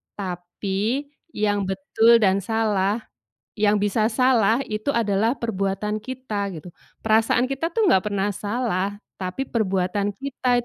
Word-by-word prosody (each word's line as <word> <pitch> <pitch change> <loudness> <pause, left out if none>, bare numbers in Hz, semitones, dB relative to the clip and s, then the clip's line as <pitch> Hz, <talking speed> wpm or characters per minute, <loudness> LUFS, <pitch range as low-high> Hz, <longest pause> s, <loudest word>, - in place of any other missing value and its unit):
tapi 195 +8 -3 0.2
yang 205 -2 0
betul 220 +5 +3
dan 195 -1 +4
salah 210 0 0 0.5
yang 210 -1 +2
bisa 210 +2 +1
salah 230 -2 +3
itu 215 +6 -2
adalah 225 0 +1
perbuatan 210 -1 -2
kita," 240 -6 -4
gitu, 175 +2 -11 0.3
"perasaan 225 +3 +3
kita 275 +5 -2
tuh 440 +5 +1
enggak 210 - +3
pernah 200 0 -1
salah, 205 -3 -2 0.2
tapi 185 +9 -3
perbuatan 200 -2 0
kita 250 -2 0
210 Hz, 125 wpm, -23 LUFS, 195-235 Hz, 0.5 s, dan